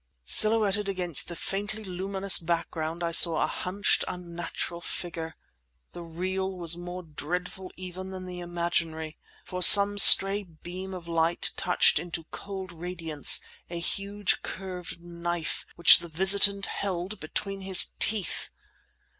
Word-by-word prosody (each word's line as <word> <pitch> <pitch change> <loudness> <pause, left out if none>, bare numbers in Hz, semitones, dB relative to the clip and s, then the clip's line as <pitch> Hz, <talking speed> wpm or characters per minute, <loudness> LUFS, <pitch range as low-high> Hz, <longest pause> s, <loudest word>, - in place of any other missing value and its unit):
Silhouetted 210 - +4
against 180 -5 0
the 170 - -8
faintly 205 +5 -5
luminous 190 +1 +1
background 165 0 -5
I 170 - -3
saw 165 -1 +6
a - - 0
hunched, 195 +3 -2
unnatural 175 -1 -8
figure. 165 -2 -7 0.6
The 175 - -11
real 185 +3 -5
was 170 -2 -1
more 175 +1 -9
dreadful 180 +4 -7
even 185 +1 -9
than 185 -1 -9
the 180 -1 -9
imaginary—for 170 0 -6
some 205 +2 +6
stray 195 +1 +8
beam 185 +1 -11
of 175 -2 -11
light 165 0 -1
touched 180 - +2
into 170 -1 -7
cold 190 -2 -9
radiance 165 -3 +2 0.3
a 170 0 -6
huge 200 +3 -3
curved 180 -3 -9
knife 170 -1 -6
which 170 - +6
the 170 - -9
visitant 195 +4 +4
held 190 +1 -6
between 195 +5 -6
his 190 -1 +3
teeth! 205 -5 +2
180 Hz, 130 wpm, -25 LUFS, 170-195 Hz, 0.6 s, stray